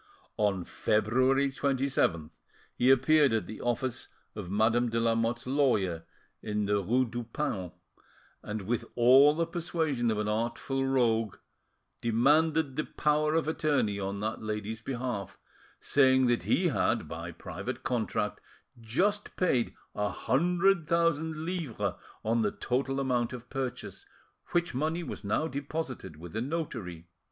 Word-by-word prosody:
On 100 -4 +1
February 130 +9 +2
27th 130 - 0 0.4
he 125 - +2
appeared 140 +2 +5
at 110 - 0
the 110 - -8
office 120 +1 -1 0.3
of 100 -5 -7
Madame 115 +4 +2
de 115 0 0
Lamotte's 115 +1 0
lawyer 110 - +1 0.4
in 105 -1 -1
the 100 0 +1
rue 125 +7 +2
du 120 0 -5
Paon, 110 - -3 0.7
and, 105 -1 -5
with 115 +4 -1
all 130 +5 +7
the 165 +1 +1
persuasion 160 -7 -1
of 110 - 0
an 105 0 -1
artful 115 +5 -1
tongue, 115 -4 +2 0.7
demanded 145 +5 +2
the 155 - +1
power 150 +1 +1
of 165 -1 +1
attorney 150 -11 +1
on 100 0 -3
that 110 +1 -3
lady's 110 0 -4
behalf, 120 -6 -4 0.4
saying 130 -2 +4
that 120 -1 +2
he - - +2
had, - - 0
by - - -6
private - - -6
contract, - - -1 0.4
just 195 - 0
paid 130 -10 +1 0.2
a 105 0 -1
hundred 175 - +2
thousand 160 -2 +1
livres 140 - -2 0.3
on 115 +1 +2
the 105 - +2
total 135 +2 -1
amount 125 -3 0
of 125 0 -9
purchase, 135 -2 -5 0.4
which 175 0 0
money 160 +6 -1
was - - -7
now 105 +10 0
deposited 140 - -5
with 85 +5 -10
a 110 - -1
notary. 120 - -4
125 Hz, 140 wpm, -29 LUFS, 110-150 Hz, 0.7 s, all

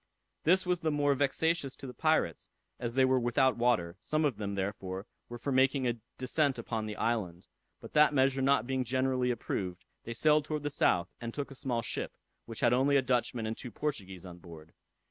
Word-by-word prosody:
This 185 +4 +4
was 180 -1 +1
the 160 -2 0
more 145 -1 +2
vexatious 140 +1 0
to - - -10
the 125 - -7
pirates, 155 - 0 0.3
as 120 0 -3
they 130 -1 +5
were 130 0 +3
without 125 +2 +2
water; 110 -8 +1
some 155 0 0
of 135 -7 0
them, 100 -2 -3
therefore, 95 0 -4 0.2
were 120 - -6
for 140 +4 -3
making 130 0 +3
a 120 -1 -1 0.2
descent 135 +1 +1
upon 110 -2 -3
the 105 - -5
island, 100 -7 -2 0.3
but - - -11
that 150 0 +6
measure 135 -1 +2
not 135 -4 +3
being 130 0 -1
generally 130 0 0
approved, 95 -6 -3 0.2
they 115 - -6
sailed 150 +3 +3
towards 150 -1 -3
the 145 - -2
south, 90 -9 +2
and 115 0 -5
took 145 -1 -4
a - - -7
small 125 -3 -2
ship, - - -4 0.3
which 115 -1 -8
had 120 -2 +4
only 140 +3 +4
a 135 - +2
Dutchman 120 -2 0
and 110 +1 -2
two 125 - -8
Portuguese 95 - -4
on 90 -1 -10
board. 80 -2 -13
125 Hz, 205 wpm, -31 LUFS, 110-140 Hz, 0.3 s, that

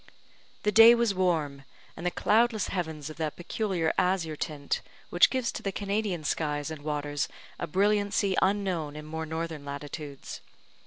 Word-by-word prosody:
The 210 - +2
day 225 +3 +9
was 235 -3 +2
warm, 160 -7 0 0.3
and 170 - -8
the 180 - +2
cloudless 220 +4 +2
heavens 160 -5 -3
of - - -11
that 155 -2 -2
peculiar 175 -2 -1
azure 180 -4 +1
tint 145 -2 -3 0.3
which 175 - +6
gives 255 -3 -1
to - - -6
the 195 - -2
Canadian 200 -3 -2
skies 150 0 -1
and 155 -2 -7
waters 145 -1 -2 0.3
a - - -3
brilliancy 200 +2 +2
unknown 190 -7 0
in 150 0 -7
more 160 +1 -5
northern 160 -1 -4
latitudes. 145 0 -7
165 Hz, 155 wpm, -28 LUFS, 150-200 Hz, 0.3 s, day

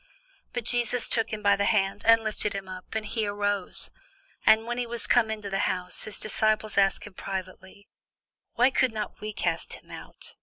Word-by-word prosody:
But 245 - -3
Jesus 240 +1 +1
took 225 -1 +3
him 215 -1 -5
by 200 0 +5
the 200 0 0
hand, 200 -2 +1
and 230 0 +6
lifted 215 -1 -1
him 195 -1 -5
up; 185 +3 -9
and 220 -1 -2
he 220 -1 -2
arose. 205 -1 -1 0.6
And 220 +1 +6
when 240 +1 -3
he 245 - -2
was 235 0 +3
come 235 -3 +4
into 215 -2 -4
the 195 - 0
house, 180 -1 -3
his 215 - -6
disciples 215 0 0
asked 195 -1 +2
him 210 - -11
privately, 190 +1 -7 0.7
Why 250 +3 +4
could 260 -3 +2
not 215 -1 -5
we 215 0 -4
cast 175 -5 -2
him - - -13
out? - - -9
215 Hz, 195 wpm, -27 LUFS, 195-225 Hz, 0.7 s, and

